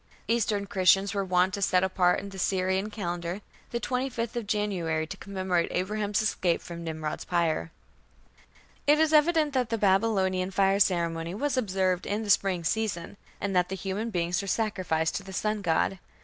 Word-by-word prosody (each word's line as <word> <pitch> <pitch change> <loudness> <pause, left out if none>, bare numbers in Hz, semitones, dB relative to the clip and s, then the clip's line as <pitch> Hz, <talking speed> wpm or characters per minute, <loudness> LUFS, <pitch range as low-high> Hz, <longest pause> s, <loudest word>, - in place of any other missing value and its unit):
Eastern 215 -3 +1
Christians 195 +1 +3
were 200 -1 0
wont 185 0 +2
to 200 - -3
set 185 -1 +3
apart 185 -1 +2
in 200 - -7
the 195 -1 -9
Syrian 190 +2 0
calendar 175 -2 -4 0.3
the 235 - -2
25th 250 -2 -2
of 235 -3 -3
January 180 -7 -1
to - - -7
commemorate 185 -3 -1
Abraham's 205 +3 -1
escape 180 -5 +1
from 170 -1 -8
Nimrod's 155 -2 -4
pyre. 170 -2 0 1.2
It 295 +1 +6
is 315 0 +3
evident 305 -1 +4
that 250 -4 0
the 230 - 0
Babylonian 190 -2 +2
fire 195 +1 +2
ceremony 170 -2 +1
was 285 +4 -1
observed 190 -6 0
in 210 +2 -1
the 205 - +1
spring 190 -4 +2
season, 205 -2 -2 0.2
and 200 -2 -2
that 180 0 +3
human 195 +4 -3
beings 175 -2 0
were 200 - -7
sacrificed 185 -7 0
to 200 - -7
the 190 0 -10
sun 215 +2 -1
god. 185 +1 +1
195 Hz, 170 wpm, -28 LUFS, 180-215 Hz, 1.2 s, It